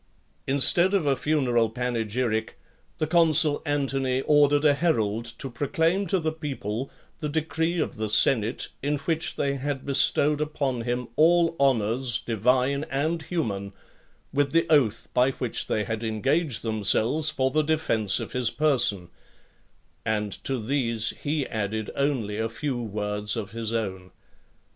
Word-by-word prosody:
Instead 170 +8 +5
of 185 -6 +1
a 140 -1 +2
funeral 125 -7 +1
panegyric, 115 -1 -2 0.4
the 155 - 0
consul 160 -2 +3
Antony 135 -2 0
ordered 145 0 +3
a 145 - +6
herald 115 -8 0
to 115 +3 -7
proclaim 165 +9 0
to 190 - +1
the 160 -1 -1
people 135 -6 -5 0.3
the 150 - -3
decree 160 +2 -1
of - - -3
the 110 0 -3
senate, 110 +1 +3
in 145 +2 -1
which 160 +2 -2
they 140 -1 -1
had 135 0 -4
bestowed 145 +2 +3
upon 140 -5 -2
him 120 +1 -3
all 165 +1 +4
honours, 120 -2 +1
divine 125 +5 0
and 160 +3 -2
human; 105 - -3 0.6
with 140 0 0
the 165 0 +3
oath 120 -7 +2
by 125 +1 +3
which 125 -3 -3
they 105 - 0
had 110 0 -4
engaged 135 +6 0
themselves 115 +7 +1
for 130 -3 -1
the 155 - +2
defence 145 -10 +1
of - - -6
his 125 -2 +1
person; 125 -12 +3 1.0
and 105 -1 -1
to 135 - -2
these 115 -2 -1
he 145 -1 -1
added 110 0 -3
only 125 -7 -1
a 115 0 -1
few 125 +1 -3
words 105 -1 -3
of 110 -5 -5
his 115 0 -4
own. 95 -5 -4
130 Hz, 145 wpm, -25 LUFS, 110-150 Hz, 1.0 s, a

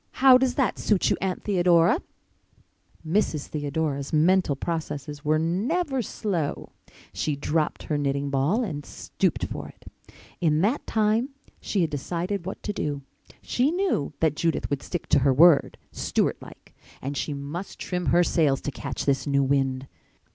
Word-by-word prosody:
How 260 -1 +7
does 255 -1 +1
that 265 -4 0
suit 205 -4 +2
you, - - +2
Aunt 185 -1 -2
Theodora?" 180 - +3 1.1
Mrs. 160 -4 0
Theodora's 145 -1 -3
mental 165 0 +3
processes 150 -2 -4
were 155 0 +2
never 250 - 0
slow. 185 -8 -3 0.4
She 150 - -1
dropped 150 +2 -1
her 150 -2 -1
knitting 140 0 -1
ball 145 - +1
and 150 -9 -4
stooped - - -2
for - - -6
it. - - -17 0.5
In 155 -2 +2
that 230 +9 0
time 220 +4 +1 0.3
she 200 - -1
had 165 - 0
decided 175 +6 -3
what 190 - -6
to 205 - -2
do. 145 -6 -3 0.4
She 255 +3 +1
knew 350 - 0
that 160 -2 +2
Judith 165 -2 -1
would 140 - -1
stick 175 - -4
to - - +5
her 135 +1 +3
word, 165 0 +5
Stewart - - -1
like, - - -14 0.3
and 140 +2 -4
she 145 +1 -2
must 145 +7 -6
trim 180 -1 -3
her 175 +1 +5
sails 150 -6 +2
to 145 - -3
catch 140 -1 -5
this 140 0 +1
new 140 -1 +2
wind. 135 -1 0
160 Hz, 160 wpm, -25 LUFS, 145-195 Hz, 1.1 s, How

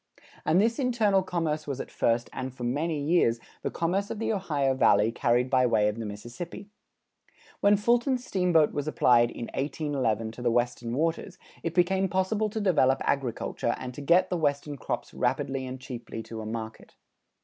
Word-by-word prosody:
And 165 +4 +4
this 230 +4 +2
internal 225 -7 +2
commerce 160 -4 -2
was 140 -2 -3
at - - -6
first, 115 +1 +1
and 130 0 -4
for 125 -1 -9
many 150 +6 -1
years, 145 -6 +2 0.2
the - - -2
commerce 190 +5 -1
of - - -4
the 225 +1 -1
Ohio 145 -9 0
Valley 105 -4 +4
carried 120 +1 +1
by 130 -1 +3
way 105 -3 +3
of 105 +2 -2
the 110 - -4
Mississippi. 120 - -8 0.9
When 200 0 +4
Fulton's 240 +4 +1
steamboat 175 -5 +2
was 145 0 -3
applied 120 -5 +4
in 120 - -6
1811 135 -7 -1
to 120 - -10
the 120 - +2
Western 120 0 -1
Waters, 165 +5 -1 0.2
it 165 -1 -4
became 190 +2 +2
possible 200 +4 0
to 220 - -4
develop 145 -10 +3
agriculture 120 -3 -1
and 125 -1 -6
to 145 - -8
get 170 +6 +3
the 180 - +1
Western 145 -2 -1
crops - - -4
rapidly 135 +1 -1
and 130 +1 -6
cheaply 120 -3 -7
to 110 0 -7
a 110 - -6
market. 110 0 -7
145 Hz, 180 wpm, -27 LUFS, 120-185 Hz, 0.9 s, And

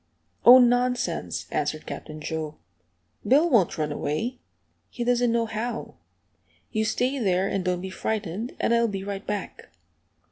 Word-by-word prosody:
"Oh, 245 +3 +10
nonsense!" 245 0 +1
answered - - -2
Captain 155 -1 -7
Joe. 155 -1 -4 0.7
"Bill 285 +10 +4
won't 225 - +3
run 150 -1 -1
away. 220 - -2 0.5
He 240 - -4
doesn't 245 0 +2
know 230 0 +1
how. 225 +1 -4 0.8
You 220 -1 0
stay 255 +5 0
there, 190 -3 +1
and 195 -2 -1
don't 180 -1 -1
be 190 0 -6
frightened, 215 +2 -3
and - - +2
I'll 235 0 +3
be 195 -3 -4
right 200 0 -6
back." 205 -1 -5
220 Hz, 145 wpm, -25 LUFS, 185-245 Hz, 0.8 s, Oh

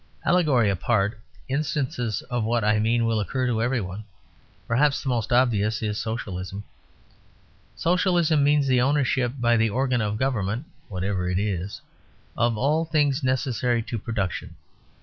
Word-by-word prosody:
Allegory 150 - +3
apart, 100 +2 0 0.3
instances 135 - -2
of 120 -2 -2
what 115 0 0
I 105 0 +3
mean 115 +2 +2
will 115 -1 +1
occur 130 +5 -1
to 115 -3 0
every 125 +2 +1
one; 95 +3 -6 0.6
perhaps 140 +4 +2
the 135 - -2
most 120 -3 -1
obvious 115 -4 +2
is 105 0 -2
Socialism. 100 -3 -4 1.1
Socialism 170 -3 +2
means 145 0 +3
the 130 -2 +3
ownership 130 -2 +1
by 120 -1 +3
the 115 0 +2
organ 125 +1 0
of 105 0 -1
government 120 0 -1 0.2
(whatever 95 -1 -2
it 90 - 0
is) 100 -1 -3 0.5
of 120 -1 +1
all 150 +7 +2
things 150 -3 +1
necessary 125 -2 0
to 115 0 -4
production. 105 -5 -3
120 Hz, 145 wpm, -25 LUFS, 105-135 Hz, 1.1 s, Allegory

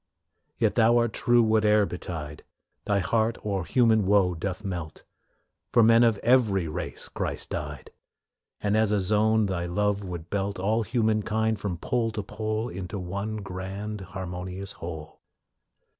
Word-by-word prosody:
Yet - - +2
Thou 115 +1 +4
art 120 -2 +1
true 120 -1 +3
whate'er 105 -1 +4
betide; 80 -5 -6 0.4
Thy 100 - +2
heart 115 +3 +1
o'er 100 -3 -1
human 110 -4 +3
woe 100 -3 +4
doth 95 +5 -4
melt; 85 -5 -5 0.7
For 120 - +5
men 115 +1 +6
of 115 -3 +3
every 110 -8 +3
race 75 - -5
Christ - - -4
died, - - -5 0.7
And, 105 0 0
as 110 -1 +3
a 105 - +2
zone, 105 +3 +3
Thy 90 -3 -2
love 105 +3 0
would 85 -3 -7
belt 100 0 -1
All 105 +5 +1
human 110 -1 +1
kind 110 +1 0
from 95 -4 -3
pole 120 +4 0
to 105 -1 -3
pole 110 +2 -3
Into 95 -1 -6
one 100 +4 -4
grand, 100 +3 -5
harmonious 95 +1 -6
whole. 80 -2 -8
105 Hz, 150 wpm, -27 LUFS, 95-110 Hz, 0.7 s, men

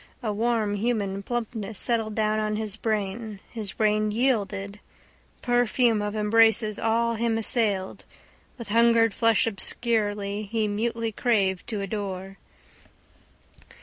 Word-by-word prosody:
A 215 -2 -1
warm 220 -1 0
human 205 -2 -1
plumpness 225 -2 -4
settled 225 -1 -1
down 215 0 +1
on 215 0 -1
his 215 -1 -3
brain. 215 -1 -3
His 215 -4 -5
brain 215 0 +1
yielded. 210 -4 -1 0.6
Perfume 245 -2 +2
of 205 +1 -3
embraces 215 0 +3
all 230 +1 +1
him 230 0 0
assailed. 210 -4 0 0.5
With 235 -4 -8
hungered 230 0 +4
flesh 230 -1 +3
obscurely, 205 -1 0
he 220 -2 +1
mutely 225 +2 -2
craved 200 -5 0
to 215 -3 -3
adore. 195 -1 -5
215 Hz, 115 wpm, -26 LUFS, 205-230 Hz, 0.6 s, hungered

